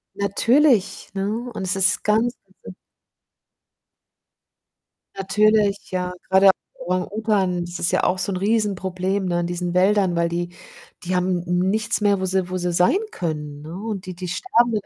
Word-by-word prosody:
Natürlich, 230 +3 +2
ne, 195 0 -1
und 230 0 -4
es 185 0 0
ist 190 -1 +2
ganz, 225 +4 +1 0.3
also 95 -1 -10 2.4
Natürlich, 205 +1 +1
ja, 180 -1 -2 0.2
grade 190 +1 +5
auch - - +9 0.3
Orang-Utan 190 0 0
das 175 +1 -7
ist 170 - +1
ja - - +1
auch 185 - +2
so 195 - -2
'n - - -2
Riesenproblem, 195 -2 -1
ne, 175 -1 0
in 170 - -2
diesen 175 0 -3
Wäldern, 190 -1 +3
weil 170 0 +1
die 175 +1 -3 0.6
die 180 +1 -1
haben 180 -1 0
nichts 200 +6 0
mehr, 205 -2 +3
wo 190 - -1
sie 185 -1 -1
wo 185 - -2
sie 175 -1 -2
sein 180 - +3
können, 150 -4 -4
ne? 155 +3 -9
Und 205 -1 -5
die 185 -1 -7
die 180 0 -6
sterben, 230 - +1
190 Hz, 160 wpm, -22 LUFS, 180-210 Hz, 2.4 s, auch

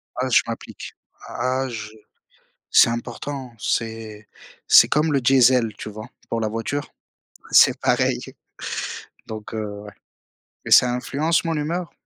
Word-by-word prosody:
Ah 130 +1 -2
je 120 - +5
m'applique. 115 0 -8 0.3
Ah 130 +2 -2
je 110 -3 -6 0.8
c'est - - +6
important. 130 +2 -6
C'est 110 -1 -4 0.4
c'est - - +7
comme 150 +1 +1
le 140 - +2
diesel, 125 -3 +4
tu 105 - -7
vois? 110 +1 -9 0.2
Pour 115 - -2
la 110 - -1
voiture? 115 +6 -4 0.6
C'est - - +6
pareil. - - +1 1.1
Donc 110 0 -8
heu, 105 -2 -5
ouais. - - -11 0.8
Mais - - -6
ça 125 - +7
influence 145 +6 0
mon 165 -1 -2
humeur. 165 +3 -3
120 Hz, 135 wpm, -22 LUFS, 110-140 Hz, 1.1 s, c'est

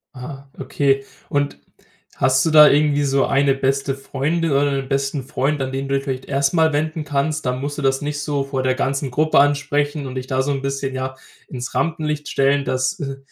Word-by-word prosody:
Ah, 135 +2 -9
okay. 135 -1 0 0.3
Und 145 - -1 0.6
hast 130 0 +3
du 160 - +2
da 150 -1 +9
irgendwie 145 0 +3
so 135 -1 +2
eine 140 0 +3
beste 135 0 0
Freundin 145 +4 -1
oder 140 +1 +2
'n 135 - -7
besten 135 0 -1
Freund, 135 +3 -1
an 130 - -2
den 135 +1 -3
du 140 - 0
dich 135 - -1
vielleicht 130 -2 -4
erstmal 145 +3 +2
wenden 155 +1 -1
kannst? 145 +2 -1
Dann 125 +1 -1
musst 145 +1 -4
du 150 - -3
das 135 0 +1
nicht 145 0 -3
so 145 -2 -1
vor 135 -1 -3
der 130 0 +2
ganzen 135 0 -1
Gruppe 155 +3 +3
ansprechen 145 0 +1
und 130 - -7
dich 130 -1 -4
da 130 -1 0
so 140 +2 -1
'n 135 -1 -2
bisschen, 135 -1 -2
ja, 130 0 -3 0.3
ins 125 -2 -6
Rampenlicht 150 -2 -1
stellen, 140 +1 +1
dass 130 +8 -1
äh, 135 -2 -4
140 Hz, 205 wpm, -20 LUFS, 135-145 Hz, 0.6 s, da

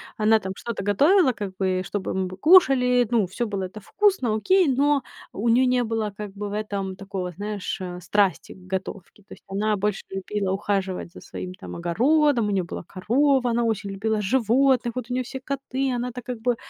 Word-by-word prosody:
Она 220 0 +4
там 190 -1 -5
что-то 235 -4 -5
готовила 280 - +4
как 195 -3 -6
бы, 185 -1 0
чтобы 205 -2 -3
мы 190 -1 -1
кушали, 255 - +5
ну, 220 -6 +2
всё 235 +6 -3
было 200 -2 -3
это 195 +3 -7
вкусно, 375 - +1
окей, 370 - +3
но 280 +1 +2 0.3
у 225 +4 -1
неё 245 +3 +4
не 250 -1 +2
было 220 -2 -2
как 210 0 -6
бы 205 +1 -5
в 200 - -6
этом 200 -3 -3
такого, 190 -2 -5
знаешь, 205 +3 -4
э, 180 -1 -5
страсти 195 0 +1
к 185 0 -13
готовке. 190 +1 -5
То - - -13
есть - - -16
она 210 +2 0
больше 205 0 -1
любила 195 0 -3
ухаживать 195 -3 -2
за - - -12
своим 185 0 -7
там 185 - -9
огородом, 240 - +2
у - - -1
неё 195 -2 +1
была 175 - -7
корова, 255 - +1
она 235 +1 +1
очень 210 -3 -1
любила 215 +2 -1
животных, 245 +2 +2
вот 250 -1 -5
у - - 0
неё 255 0 0
все 265 +2 -7
коты, 270 -1 -2
она-то 250 0 -3
как 245 -1 -6
бы 245 0 +1
215 Hz, 200 wpm, -24 LUFS, 195-250 Hz, 0.3 s, кушали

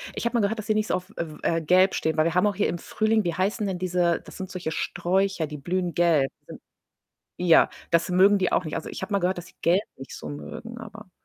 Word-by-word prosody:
Ich - - -4
habe 235 - 0
mal - - +2
gehört, 210 +3 0
dass 215 - -6
sie 215 - +3
nicht 215 0 0
so - - -1
auf, 185 +2 -6
äh, 170 - -2
w - - -12
äh, 165 0 +1
gelb 185 +4 +4
stehen, 160 0 -1
weil 155 - +4
wir 165 - +1
haben 185 +3 +4
auch 200 - -1
hier 205 - +1
im 175 - -2
Frühling 220 +3 0
wie 170 - -1
heißen 200 +4 -1
denn 185 -2 -3
diese 175 -2 +1
das - - -11
sind 190 -1 -6
solche 180 -4 -4
Sträucher, 180 -1 0
die 150 - -7
blühen 175 +4 -2
gelb, 165 -6 +3 0.2
sind - - -10 0.8
ja. 170 -2 +6 0.2
Das 170 +1 +2
mögen 190 +3 +5
die 185 -2 0
auch 180 - +1
nicht. 155 - -4
Also, - - -4
ich - - -7
habe 210 - -4
mal 200 - +3
gehört, 180 +1 0
dass 175 - -7
sie - - -20
gelb 180 +4 +3
nicht 135 - -10
so - - -8
mögen, 230 +10 -8
aber 220 -3 -10
180 Hz, 270 wpm, -25 LUFS, 170-200 Hz, 0.8 s, ja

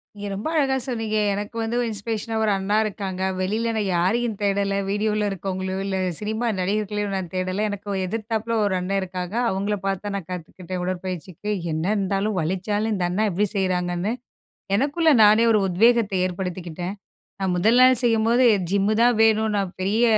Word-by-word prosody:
நீங்க 205 0 -6
ரொம்ப 200 +7 -4
அழகா 275 -4 +2
சொன்னீங்க. 225 -4 -2 0.2
எனக்கு 205 +3 -5
வந்து 225 +1 -2
ஒரு - - 0
இன்ஸ்பிரேஷனா 220 +1 -4
1 215 - +2
அண்ணா 195 +2 0
இருக்காங்க.வெளில 190 +2 -2
நான் 215 -2 0
யாரையும் 225 +7 +1
தேடல. 200 0 +1
வீடியோல 210 +1 0
இருக்கவங்களையோ, 190 0 -3
இல்ல 195 -1 -1 0.2
சினிமா 220 +3 -2
நடிகர்களையோ 205 +2 -1
நான் 190 -3 -3
தேடல. 185 +2 -1
எனக்கு 205 0 -5 0.2
எதிர்த்தாப்புல 225 +2 -2
1 200 -2 +1
அண்ணன் 195 +2 -1
இருக்காங்க. 180 +1 -5
அவங்கள 200 +2 -1
பார்த்து 195 0 -1
தான் 205 -1 -3
நான் 180 -5 -8
கத்துக்கிட்டேன், 180 +1 -6
உடற்பயிற்சிக்கு. 185 +1 -4 0.2
என்ன 160 +1 -2
இருந்தாலும், 200 +1 0
வலிச்சாலும் 200 +6 -1
இந்த 185 -3 0
அண்ணா 205 +5 +1
எப்டி 195 +4 +1
செய்றாங்கன்னு, 180 0 0 0.7
எனக்குள்ள 295 +7 +2
நானே 215 +2 +6
ஒரு 215 - +3
உத்வேகத்தை 215 +1 +3
ஏற்படுத்திக்கிட்டேன். 180 0 -5 0.5
நான் 190 -2 0
1ல் 220 +7 +4
நாள் 255 -1 +6
செய்யும்போது, 230 +2 +3 0.3
ஜிம்மு 200 +2 +2
தான் 240 -1 +4
வேணும். 220 0 +3
நான் 195 -3 -1
பெரிய 210 +5 +2
200 Hz, 160 wpm, -23 LUFS, 185-220 Hz, 0.7 s, நானே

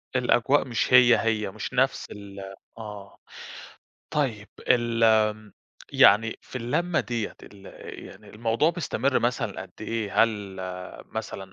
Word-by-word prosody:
الأجواء 130 +2 +3
مش 120 +1 -1
هي 125 -1 +8
هي، 110 -3 -1
مش 110 +4 -6
نَفس 130 +2 +1
ال 100 -1 -10 0.4
آه. 105 -3 -9 0.9
طيب، 115 -8 -1 0.2
ال 120 -2 +3
آمم 110 -1 +2 0.4
يعني 110 +3 +5
في - - -10
اللمّة 170 +9 0
دِيّة 115 -3 -4
ال 100 -1 -14 0.4
يعني 100 +2 -14
الموضوع 115 +8 +1
بيستمر 140 -5 0
مثلًا 120 +1 -2
قد - - -13
إيه؟ 110 -3 0
هل 105 -4 -2 0.5
مثلًا 95 -4 -7
115 Hz, 125 wpm, -26 LUFS, 105-125 Hz, 0.9 s, هي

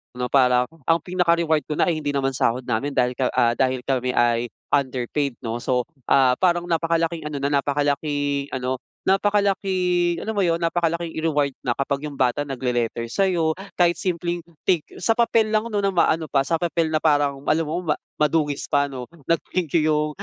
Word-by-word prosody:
'no, 125 -1 -3
parang 125 -2 +4 0.2
ang 165 0 +4
pinaka-reward 170 -3 +2
ko 150 - -2
na 175 - +2
ay 160 - -2
hindi 145 -2 -3
naman 135 -1 +1
sahod 125 -1 0
namin, 125 +4 -2
dahil 125 -1 +2
ka 130 - +2
ah, 120 0 +4
dahil 130 0 0
kami 125 -1 -1
ay 120 0 +2 0.2
underpaid, 135 0 0
'no. 115 0 -3
So, 125 0 0 0.2
ah, 130 -2 +5
parang 175 -2 +2
napakalaking 165 -1 0
ano 150 -2 -4
na 140 - +1
napakalaking 145 0 -1
ano 130 0 -2 0.3
napakalaking 190 -3 +1
alam 220 0 -4
mo 200 - +2
yun, 170 -2 +1
napakalaking 170 0 -1
reward 145 -4 +1
na 125 - 0
kapag 140 +1 -1
yung 150 -2 -7
bata 130 +3 +2
nagle-letter 120 -4 -2
sa'yo, 165 +2 +1 0.2
kahit 175 -1 +4
simpleng, 175 -1 -2 0.2
"Thank 175 -5 +3
you." - - -12
Sa 225 +5 +2
papel 230 -2 +3
lang 215 0 +1
'no 205 - 0
na 195 -1 0
maano 165 -2 +2
pa, 135 -2 +2
sa 165 +3 -1
papel 165 -1 0
na 155 - +2
parang 145 -3 +2
alam 165 +2 +3
mo 165 +3 -4
ma 150 - +2 0.2
madungis 150 -1 +1
pa 145 -2 +2
ano, 125 -2 -7 0.2
nag-thank 165 +1 -1
you 155 - +1
yung 150 0 +1
150 Hz, 185 wpm, -23 LUFS, 135-170 Hz, 0.3 s, ah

